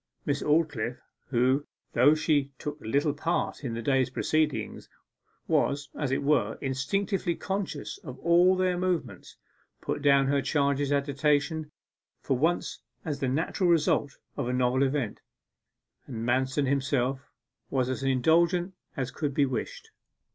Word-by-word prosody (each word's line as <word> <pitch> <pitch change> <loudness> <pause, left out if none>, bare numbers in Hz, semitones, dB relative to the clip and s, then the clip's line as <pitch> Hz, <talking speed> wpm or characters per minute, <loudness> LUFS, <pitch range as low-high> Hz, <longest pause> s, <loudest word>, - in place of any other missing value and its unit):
Miss 145 -1 0
Aldclyffe, 145 -7 +1 0.3
who, 130 +3 +2 0.3
though 140 +6 +5
she 145 -3 +1
took 150 +2 -6
little 140 +6 +1
part 160 +1 -2
in 120 -4 -3
the 115 - -4
day's 135 0 +2
proceedings, 155 +3 -1 0.6
was, 140 0 +1
as 145 -3 -2
it 135 - 0
were, 150 +2 +2
instinctively 170 +7 -1
conscious 195 +1 -4
of 130 -4 -9
all 175 +4 +4
their 185 -1 +1
movements, 180 -2 -3 0.4
put - - -3
down 140 -1 +5
her 140 +1 +2
charge's 140 -1 +1
agitation 145 +2 0 0.5
for 135 - -1
once 165 +7 0 0.3
as 145 -4 -3
the 135 - 0
natural 165 +6 0
result 155 -4 +2 0.2
of - - -2
the 125 - -1
novel 125 +1 +2
event, 135 -5 -1 0.9
and 115 -3 -5
Manston 130 +3 +1
himself 135 -1 0 0.4
was 130 -2 0
as 130 +1 -3
indulgent 170 +7 +2 0.2
as 130 -2 -2
could 145 -3 -3
be 145 - +4
wished. 460 - -5
140 Hz, 140 wpm, -28 LUFS, 130-160 Hz, 0.9 s, though